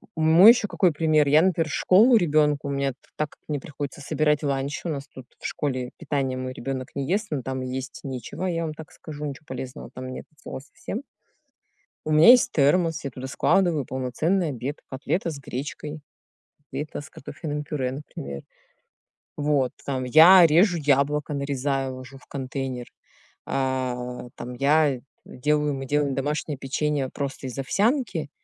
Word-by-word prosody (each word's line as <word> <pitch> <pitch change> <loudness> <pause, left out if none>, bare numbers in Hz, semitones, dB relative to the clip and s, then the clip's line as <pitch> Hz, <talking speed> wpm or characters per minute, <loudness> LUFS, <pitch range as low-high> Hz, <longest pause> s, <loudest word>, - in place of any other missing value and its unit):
мой 160 +6 +8
еще 235 -3 +1
какой 185 -3 +2
пример. 155 -1 +3
Я, 150 +3 +6
например, 170 -3 +1
в - - -4
школу 225 +7 +5
ребенку, 150 -5 +2
у - - -2
меня 140 0 0
т - - -15 0.2
так 155 -1 -1
как - - -21
мне 150 -2 -2
приходится 145 0 -7
собирать 150 +1 +1
ланч, 140 0 -1
у - - -1
нас 140 -2 -4
тут 130 -1 -12
в - - -12
школе 130 -4 -3
питание 140 -5 -2
мой 130 0 -4
ребенок 130 0 -5
не 140 0 -3
ест, 205 +4 0
но 145 -3 -1
там 130 +1 -4
есть 130 +1 -5
нечего, 130 +6 -5
я 170 -2 -1
вам 155 -1 -3
так 160 0 -11
скажу, 150 -1 -8
ниче 140 -2 -6
полезного 130 0 -7
там 130 0 -7
нет - - -8
от 155 - -30
слова - - -6
совсем. 155 - -7 1.0
У 155 - -2
меня 155 +7 +7
есть 245 0 +7
термос, 160 +2 +2
я 140 - -4
туда 130 +1 -7
складываю 160 +1 +2
полноценный 150 +9 0
обед: 135 +2 -4
котлета 155 +7 -2
с 145 - -7
гречкой, 145 +3 -6 0.6
котлета 145 +1 -6
с 145 - -11
картофельным 150 +2 -6
пюре, 135 -4 -2
например. 70 - -7 1.0
Вот. 145 -4 +1
Там 130 -2 -2
я 170 +7 +8
режу 175 +4 +4
яблоко: 145 0 +1
нарезаю, 135 -1 -1
ложу 130 +1 -10
в 135 - -19
контейнер. 130 -2 -4 0.6
А, 125 -2 -2
там 125 - -7
я 140 0 +3 0.2
делаю 150 +3 0
мы 135 0 -5
делаем 145 -1 +1
домашнее 145 +2 -2
печенье 140 0 -1
просто 135 -1 -5
из 125 - -7
овсянки 200 - 0
145 Hz, 170 wpm, -25 LUFS, 130-155 Hz, 1.0 s, мой